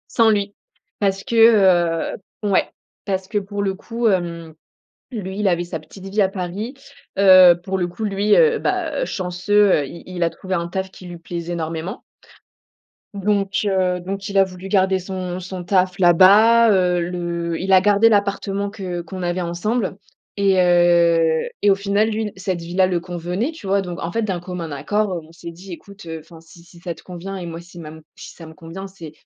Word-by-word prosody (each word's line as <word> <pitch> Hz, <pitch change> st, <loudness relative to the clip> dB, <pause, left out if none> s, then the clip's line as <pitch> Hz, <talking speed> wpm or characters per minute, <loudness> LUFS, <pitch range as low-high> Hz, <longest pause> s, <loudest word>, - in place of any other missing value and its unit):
Sans 230 Hz, -2 st, +5 dB
lui, 205 Hz, -1 st, 0 dB, 0.5 s
parce 195 Hz, -1 st, 0 dB
que, -, -, -6 dB, 0.8 s
heu -, -, -10 dB, 0.3 s
ouais! 200 Hz, -2 st, +2 dB, 0.4 s
Parce 190 Hz, -1 st, -2 dB
que 210 Hz, +1 st, -1 dB
pour 200 Hz, 0 st, -4 dB
le 195 Hz, -1 st, 0 dB
coup, 230 Hz, +4 st, -3 dB
hem, 170 Hz, -4 st, -1 dB, 0.6 s
lui, 195 Hz, -4 st, -5 dB
il 210 Hz, -, +1 dB
avait 175 Hz, -2 st, +1 dB
sa 170 Hz, -2 st, -6 dB
petite 190 Hz, +5 st, -14 dB
vie 205 Hz, +2 st, 0 dB
à 190 Hz, -, +3 dB
Paris, 195 Hz, +7 st, -5 dB, 0.4 s
heu, 185 Hz, -3 st, +7 dB
pour 190 Hz, 0 st, -2 dB
le 175 Hz, -, 0 dB
coup, 175 Hz, +5 st, -7 dB
lui, 205 Hz, 0 st, +2 dB
heu, 460 Hz, -2 st, +4 dB
bah, -, -, -1 dB
heu, -, -, 0 dB
chanceux, 190 Hz, -, +1 dB
heu, 140 Hz, -, -4 dB
il 170 Hz, -, -11 dB
il 185 Hz, -1 st, -7 dB
a 170 Hz, -, +2 dB
trouvé 185 Hz, +2 st, -7 dB
un 170 Hz, -2 st, -1 dB
taf 190 Hz, +2 st, -4 dB
qui 185 Hz, -, -12 dB
lui 175 Hz, -1 st, -8 dB
plaisait 170 Hz, +1 st, -6 dB
énormément 165 Hz, +4 st, -4 dB, 1.1 s
donc 200 Hz, -1 st, 0 dB
heu, 185 Hz, -2 st, +1 dB
donc 195 Hz, +3 st, -5 dB
il 200 Hz, -1 st, +1 dB
a -, -, +7 dB
voulu 185 Hz, 0 st, -8 dB
garder 190 Hz, -1 st, +3 dB
son 185 Hz, -1 st, -5 dB
son 185 Hz, 0 st, -7 dB
taf 185 Hz, 0 st, +1 dB
là-bas, 205 Hz, +6 st, +6 dB
heu, 180 Hz, -2 st, +2 dB
le 170 Hz, -1 st, -3 dB
il 190 Hz, +1 st, -2 dB
a 190 Hz, -, +8 dB
gardé 205 Hz, +3 st, +4 dB
l'appartement 200 Hz, -1 st, 0 dB
que 180 Hz, -4 st, -5 dB
qu'on 185 Hz, +2 st, -8 dB
avait 175 Hz, +1 st, -1 dB
ensemble 185 Hz, +4 st, -2 dB, 0.4 s
et 195 Hz, -2 st, +2 dB
heu, 170 Hz, -2 st, +3 dB
et 205 Hz, -, +4 dB
au 195 Hz, -, +5 dB
final, 200 Hz, +2 st, +1 dB
lui, 220 Hz, -1 st, -2 dB
cette 185 Hz, -1 st, -3 dB
vie-là 180 Hz, +3 st, +1 dB
le 180 Hz, -2 st, 0 dB
convenait, 180 Hz, -, -3 dB
tu 315 Hz, -11 st, -11 dB
vois 200 Hz, +1 st, +2 dB
donc, 175 Hz, -2 st, -6 dB
en 170 Hz, -, -3 dB
fait, 230 Hz, +5 st, -1 dB
d'un 190 Hz, -4 st, -2 dB
commun 175 Hz, -2 st, -6 dB
accord, 205 Hz, +8 st, -1 dB
heu, 175 Hz, -, -3 dB
on -, -, -18 dB
s'est 170 Hz, 0 st, -9 dB
dit: 180 Hz, +3 st, -12 dB
«Écoute, 200 Hz, +1 st, -13 dB
heu, 160 Hz, -1 st, -6 dB
enfin 165 Hz, +1 st, -15 dB
si 165 Hz, +1 st, -17 dB
si 170 Hz, 0 st, -18 dB
ça 170 Hz, -1 st, -5 dB
te -, -, -17 dB
convient 185 Hz, +2 st, -7 dB
et 180 Hz, -, -6 dB
moi 165 Hz, 0 st, -7 dB
si 175 Hz, +1 st, -16 dB
ma 155 Hz, -2 st, -8 dB, 0.2 s
si -, -, -11 dB
ça 165 Hz, -, -12 dB
me 160 Hz, -, -13 dB
convient 180 Hz, +3 st, -9 dB
c'est 175 Hz, -5 st, -11 dB
185 Hz, 205 wpm, -20 LUFS, 175-200 Hz, 1.1 s, a